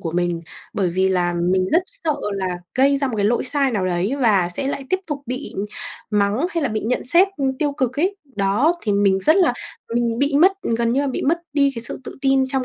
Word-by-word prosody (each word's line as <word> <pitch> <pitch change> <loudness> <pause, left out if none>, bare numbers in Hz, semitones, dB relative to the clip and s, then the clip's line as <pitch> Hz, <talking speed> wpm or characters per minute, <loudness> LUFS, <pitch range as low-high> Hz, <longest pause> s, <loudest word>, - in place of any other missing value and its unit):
của 165 - -4
mình, 175 0 -1 0.3
bởi 190 -3 0
vì 190 +2 +1
là 180 -2 +1 0.2
mình 185 0 +1
rất 340 - +4
sợ 405 -12 -3 0.2
là 195 -1 -2 0.3
gây 275 +2 +4
ra 275 0 0
một 250 - -3
cái 200 - 0
lỗi 235 +3 +1
sai 275 +1 +3
nào 195 -6 -1
đấy, 180 +7 0
và 200 -8 +3
sẽ 270 - -2
lại 280 -1 -4
tiếp 375 - +2
tục 290 -2 -4
bị 255 +4 -5 0.6
mắng 210 +8 +1
hay 335 -4 -2
là 275 - +1
bị 215 0 -2
nhận 235 +3 -2
xét, 345 +9 +6
ư, 275 - -2
tiêu 295 -2 0
cực 265 -1 -1
ấy, 390 +4 0 0.2
đó. 210 - +2
Thì 210 - 0
mình 200 -1 +3
rất 310 - +4
là 355 -8 +4 0.4
mình 235 -1 0
bị 280 0 +1
mất 375 +3 +6
ừ, 230 - -1
gần 235 0 +1
như 270 - +2
là 285 - -1
bị 265 - -3
mất 330 +5 +2
đi 280 -1 +3
cái 230 - -2
sự 240 - -2
tự - - -8
tin 270 -1 +3
trong 265 -1 -1
250 Hz, 250 wpm, -21 LUFS, 200-285 Hz, 0.6 s, xét